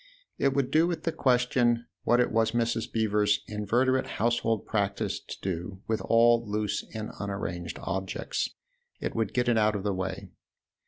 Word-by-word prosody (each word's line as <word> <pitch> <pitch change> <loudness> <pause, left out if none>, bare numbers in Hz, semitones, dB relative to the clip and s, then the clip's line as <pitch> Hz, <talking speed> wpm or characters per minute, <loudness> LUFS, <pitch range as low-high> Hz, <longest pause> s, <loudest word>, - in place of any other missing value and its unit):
It 135 -1 +2
would 140 -2 +1
do 160 +2 +4
with 170 -2 -3
the 165 - 0
question 125 -3 +2 0.2
what 120 - +4
it 125 - +2
was 115 0 +2
Mrs. 115 -1 0
Beever's 105 -2 +2
inveterate 120 +5 +1
household 115 -1 +1
practice 100 -2 -1
to - - -9
do 95 +1 -4
with 110 -1 0
all 115 0 +4
loose 105 -1 -2
and 110 -1 -4
unarranged 90 -4 -4
objects 95 -1 -2 0.5
it - - -3
would 115 -3 0
get 125 -1 0
it 120 -2 +4
out 105 0 +3
of 100 - -3
the 100 -1 0
way. 95 0 -4
110 Hz, 165 wpm, -28 LUFS, 100-120 Hz, 0.5 s, do